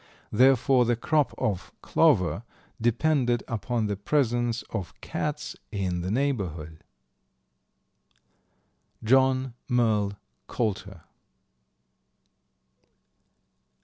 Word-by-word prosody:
Therefore, 130 Hz, +2 st, +4 dB
the 120 Hz, 0 st, +1 dB
crop 150 Hz, +5 st, +1 dB
of 95 Hz, -5 st, -2 dB
clover 90 Hz, +1 st, +3 dB, 0.4 s
depended 120 Hz, +1 st, +1 dB
upon 115 Hz, 0 st, -2 dB
the 105 Hz, -1 st, -1 dB
presence 120 Hz, +1 st, 0 dB
of 95 Hz, -6 st, -5 dB
cats 150 Hz, 0 st, -4 dB, 0.2 s
in 95 Hz, -4 st, -2 dB
the 90 Hz, -, -3 dB
neighborhood. 95 Hz, -, -2 dB, 2.2 s
John 130 Hz, +1 st, +3 dB, 0.2 s
Merle 110 Hz, -5 st, +2 dB, 0.3 s
Coulter. 100 Hz, -6 st, -3 dB
115 Hz, 75 wpm, -26 LUFS, 100-130 Hz, 2.2 s, Therefore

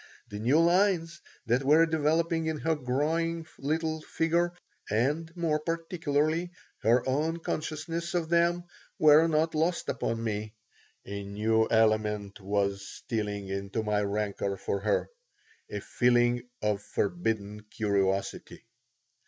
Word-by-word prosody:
The 105 Hz, -, -6 dB
new 130 Hz, +8 st, +3 dB
lines 170 Hz, -1 st, +2 dB, 0.2 s
that 120 Hz, +3 st, +1 dB
were 155 Hz, +4 st, +6 dB
developing 160 Hz, +1 st, +1 dB
in 160 Hz, -1 st, -1 dB
her 160 Hz, -, +2 dB
growing 160 Hz, +5 st, -1 dB
little 160 Hz, +2 st, -1 dB
figure, 170 Hz, +2 st, 0 dB, 0.4 s
and 145 Hz, +10 st, 0 dB
more 160 Hz, -3 st, +1 dB
particularly 165 Hz, 0 st, -1 dB, 0.3 s
her 120 Hz, +4 st, +3 dB
own 155 Hz, +5 st, 0 dB
consciousness 165 Hz, +1 st, -4 dB
of 170 Hz, -2 st, 0 dB
them, 170 Hz, +1 st, +2 dB, 0.3 s
were 155 Hz, +1 st, +6 dB
not 160 Hz, 0 st, +1 dB
lost 165 Hz, +3 st, 0 dB
upon 115 Hz, 0 st, -2 dB
me. 105 Hz, 0 st, -3 dB, 0.5 s
A 100 Hz, 0 st, -5 dB
new 110 Hz, +3 st, +1 dB
element 105 Hz, -2 st, +1 dB
was 100 Hz, 0 st, -1 dB
stealing 105 Hz, -3 st, -4 dB
into 100 Hz, +3 st, -3 dB
my 105 Hz, -1 st, +1 dB
rancor 100 Hz, -1 st, -2 dB
for 100 Hz, -, -2 dB
her 105 Hz, +1 st, 0 dB, 0.6 s
a -, -, -4 dB
feeling 120 Hz, 0 st, +2 dB
of 105 Hz, -1 st, +1 dB
forbidden 105 Hz, -, -2 dB
curiosity. 100 Hz, -3 st, -1 dB
140 Hz, 120 wpm, -29 LUFS, 105-165 Hz, 0.6 s, were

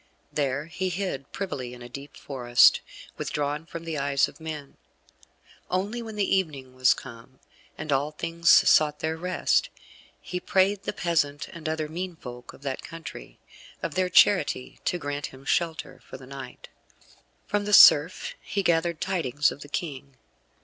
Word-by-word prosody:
There 140 Hz, 0 st, -1 dB
he 185 Hz, +3 st, -3 dB
hid 175 Hz, -7 st, -4 dB
privily 130 Hz, -11 st, -5 dB
in 125 Hz, -, -14 dB
the 120 Hz, -, -8 dB
deep 140 Hz, +4 st, -10 dB
forest, 120 Hz, -3 st, +4 dB, 0.4 s
withdrawn 150 Hz, +2 st, -3 dB
from 165 Hz, -1 st, -7 dB
the 160 Hz, -3 st, -3 dB
eyes 140 Hz, 0 st, +2 dB
of -, -, -15 dB
men; 155 Hz, -3 st, -7 dB, 0.9 s
only 205 Hz, +6 st, -1 dB
when 220 Hz, -2 st, -7 dB
the 200 Hz, -2 st, +2 dB
evening 140 Hz, -8 st, -4 dB
was 130 Hz, 0 st, +4 dB
come, 130 Hz, +1 st, -12 dB, 0.4 s
and 150 Hz, 0 st, -5 dB
all 140 Hz, +2 st, +1 dB
things 165 Hz, +2 st, -1 dB
sought 150 Hz, -1 st, +6 dB
their 160 Hz, 0 st, -1 dB
rest, 180 Hz, +3 st, +1 dB, 0.5 s
he 180 Hz, -, -5 dB
prayed 190 Hz, +2 st, +1 dB
the -, -, -1 dB
peasant 145 Hz, -4 st, 0 dB
and 165 Hz, -2 st, -6 dB
other 155 Hz, -1 st, -2 dB
mean 175 Hz, +3 st, -5 dB
folk 125 Hz, -4 st, -10 dB
of -, -, -17 dB
that 135 Hz, -2 st, -3 dB
country, 165 Hz, -3 st, -9 dB, 0.5 s
of -, -, -2 dB
their 185 Hz, 0 st, +1 dB
charity 180 Hz, -8 st, +3 dB
to 180 Hz, -, +1 dB
grant 145 Hz, -3 st, -4 dB
him 135 Hz, +1 st, -14 dB
shelter 165 Hz, +2 st, -1 dB
for -, -, -10 dB
the 130 Hz, -, -13 dB
night. 135 Hz, -1 st, -10 dB, 0.8 s
From 205 Hz, 0 st, -1 dB
the 210 Hz, -, -2 dB
serf 165 Hz, -2 st, +7 dB
he 200 Hz, -, -2 dB
gathered 170 Hz, -2 st, +1 dB
tidings 150 Hz, -7 st, +1 dB
of 145 Hz, -, -10 dB
the 145 Hz, -, -10 dB
King. 140 Hz, -4 st, -5 dB
155 Hz, 165 wpm, -26 LUFS, 140-175 Hz, 0.9 s, serf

